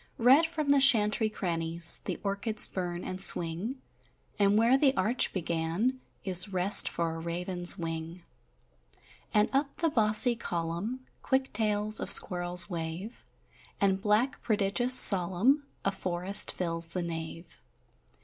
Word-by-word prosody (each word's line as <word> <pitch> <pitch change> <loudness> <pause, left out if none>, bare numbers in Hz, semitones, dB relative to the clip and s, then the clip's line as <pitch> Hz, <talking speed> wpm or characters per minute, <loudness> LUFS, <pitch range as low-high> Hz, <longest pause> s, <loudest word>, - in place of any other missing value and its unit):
Red 265 +8 +3
from 310 -3 -6
the 280 -1 +2
chantry 215 -4 +3
crannies 165 -4 +3
The - - -6
orchids 200 +2 +1
burn 175 -2 -7
and 185 +1 -2
swing, 190 +8 0 0.6
And 200 0 +1
where 230 +4 +2
the 270 -1 0
arch 215 +7 -1
began 170 +8 -4 0.2
is 185 0 +4
Rest 190 +1 +3
for 165 -1 -5
a - - -9
raven's 175 +1 0
wing; 165 +1 -8 1.1
And 210 0 +1
up 275 +1 -3
the 330 -2 -2
bossy 225 +1 +3
column 175 +5 -6 0.2
Quick 265 0 -3
tails 210 0 -2
of - - -7
squirrels 175 -1 +3
wave, 170 +4 -9 0.5
And 195 -1 -1
black, 215 +7 -2
prodigious, 220 +4 0
solemn, 200 - +4 0.2
A 195 - 0
forest 185 +1 0
fills 165 -2 0
the 175 +2 -7
nave. 165 0 -10
195 Hz, 130 wpm, -26 LUFS, 170-230 Hz, 1.1 s, is